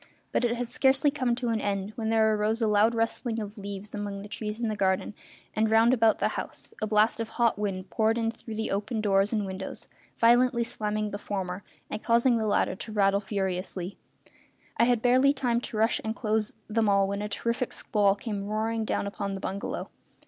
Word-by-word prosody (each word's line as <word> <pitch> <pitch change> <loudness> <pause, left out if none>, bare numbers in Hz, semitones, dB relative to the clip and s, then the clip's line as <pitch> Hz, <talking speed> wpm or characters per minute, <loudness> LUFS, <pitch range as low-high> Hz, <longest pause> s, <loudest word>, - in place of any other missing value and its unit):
But - - +1
it 240 0 +2
had 245 0 -3
scarcely 270 +3 +3
come 255 -5 0
to 245 -1 -2
an 225 -2 0
end 200 0 -2
when 225 -3 -2
there 220 -1 +4
arose 215 +2 +1
a 225 - +2
loud 210 +2 +3
rustling 230 +1 -1
of 210 -1 -6
leaves 200 -1 -7
among 205 -1 -4
the - - -8
trees 210 +1 -4
in 235 - -1
the 215 - -1
garden 190 0 0 0.4
and 220 0 +2
round 225 +2 +5
about 225 -3 +4
the - - +1
house, - - -5
a 215 - 0
blast 215 +2 +3
of 225 -1 -3
hot 235 -4 +1
wind 190 -3 -3
poured 220 +1 +2
in 225 -1 0
through 225 -1 -9
the 220 0 -2
open 210 +3 -2
doors 200 -1 +2
and 215 -3 0
windows, 190 0 -6 0.3
violently 240 +1 +4
slamming 215 -2 -2
the 205 - -5
former 190 -2 -4 0.3
and 215 - -6
causing 235 +1 +3
the 220 - -1
latter 205 - +1
to 215 - -7
rattle 200 -1 +3
furiously; 190 -2 -3 0.3
and - - -25 0.5
I - - +4
had 240 -2 +2
barely 260 +3 +5
time 245 -4 0
to 225 - -6
rush 225 +2 +2
and 220 0 -2
close 215 -2 0
them 220 -1 +1
all 195 -1 +4
when 200 +1 -3
a 210 - -3
terrific 235 +4 -2
squall 205 -4 +2
came 205 -1 -4
roaring 220 +1 -1
down - - -1
upon 200 -1 -3
the - - -5
bungalow. 195 +1 -4
215 Hz, 215 wpm, -28 LUFS, 200-230 Hz, 0.5 s, round